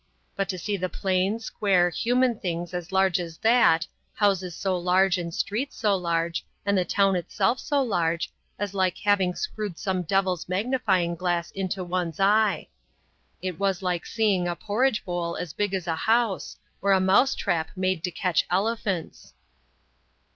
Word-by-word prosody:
But 195 -1 -2
to 185 - -2
see 205 +3 -2
the 185 0 -2
plain, 190 +4 0
square, 190 -5 +1
human 245 +3 +1
things 175 -1 -3
as 175 +1 -5
large 190 -2 +3
as 165 -2 -6
that, 225 -8 +4 0.3
houses 190 -4 +1
so 190 -2 -1
large 180 +1 +2
and 170 -1 -4
streets 225 +11 -2
so 210 -3 +2
large, 170 -2 -1 0.2
and 200 0 +2
the 185 - +3
town 195 +2 +2
itself 180 +7 0
so 285 -2 +1
large, 170 -7 -1 0.3
was 205 -1 -3
like 185 -2 +1
having 195 -3 +2
screwed 210 - -4
some 190 -3 -1
devil's 185 -1 0
magnifying 190 -4 +1
glass 175 -1 -1
into 190 -1 -3
one's 175 -2 -3
eye. 205 +1 +3 0.8
It 185 -3 -4
was 195 -2 0
like 180 -2 -1
seeing 200 -6 +1
a 175 - -1
porridge 215 +5 0
bowl 175 -1 -2
as 175 -4 -5
big 205 -2 -1
as 190 -3 -2
a 165 -2 -1
house, 225 +2 0 0.2
or 200 0 +3
a 190 - +4
mouse 190 +8 +4
trap 165 -4 -1
made 185 -2 -1
to 180 - 0
catch 180 0 0
elephants." 195 -2 -2
190 Hz, 165 wpm, -26 LUFS, 175-205 Hz, 0.8 s, that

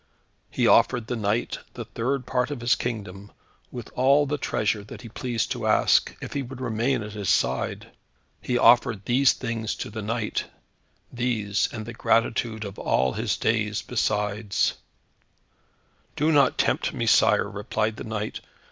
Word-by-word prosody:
He - - 0
offered 120 -2 +4
the 120 - -3
knight 110 +1 -1 0.2
the - - -6
third 130 +2 -2
part 125 +1 0
of 145 -5 -5
his 120 +1 +3
kingdom, 100 -4 -5 0.4
with 120 -3 -8
all 140 +3 +4
the 145 +1 -2
treasure 105 -3 -1
that 105 - -11
he 115 - -9
pleased 120 0 -2
to - - -2
ask, - - +3
if - - -7
he 140 - -1
would 130 0 -8
remain 120 0 0
at 105 - -7
his 100 -4 -3
side. - - 0 0.5
He 125 - 0
offered 115 -4 +4
these 130 +2 +4
things 115 -3 -3
to - - -6
the 110 +1 -5
knight 105 +1 -2 0.7
these, 110 -5 0
and 110 -2 -6
the 120 - -7
gratitude 115 -1 0
of 100 -1 -8
all 65 0 +1
his - - -1
days 105 -2 0
besides. 105 -3 0 1.4
"Do 155 +2 +2
not 140 -4 +4
tempt - - 0
me, - - -1
sire," - - +4
replied 110 +1 -2
the - - -6
knight. 110 -1 -4
115 Hz, 160 wpm, -25 LUFS, 105-125 Hz, 1.4 s, offered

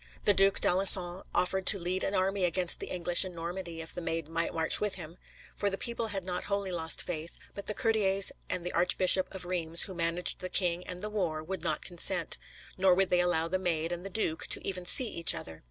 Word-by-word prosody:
The 205 - +5
Duc 195 0 +3
d'Alençon 185 -1 +4
offered 190 +1 -1
to 205 - +9
lead 180 +1 -3
an 200 - -2
army 190 +1 -1
against 180 0 +5
the - - -6
English 175 0 +3
in 185 -2 -8
Normandy, 170 0 -6
if 160 - +3
the 175 - -6
Maid 165 -2 -4
might 165 +1 -2
march 160 0 +3
with 210 -1 +1
him, 170 -1 -11 0.4
for 205 - -1
the 195 - -4
people 235 +1 -3
had 195 -3 -5
not 180 0 -5
wholly 200 -1 -3
lost 165 -2 0
faith, 165 -1 -6 0.2
but 200 - -10
the 210 - -3
courtiers 200 -4 +2 0.2
and 180 -1 -4
the 180 - -4
Archbishop 185 +1 +2
of 185 -2 -3
Reims, 170 -2 +1
who 190 - -8
managed 170 0 -2
the 185 - -7
king 180 -2 -1
and 180 0 -8
the 210 - -5
war, 170 -7 -3
would 190 +4 -6
not - - -3
consent, 175 -1 +1 0.4
nor 185 -1 +4
would 195 0 0
they 180 - +2
allow 170 -2 -1
the 185 +2 -2
Maid 165 -2 -3
and 175 0 -6
the 195 - -7
duke 180 -5 -3
to - - -1
even 180 -2 -4
see 255 +4 +4
each 170 -6 -1
other. 80 -1 -9
180 Hz, 230 wpm, -29 LUFS, 170-195 Hz, 0.4 s, to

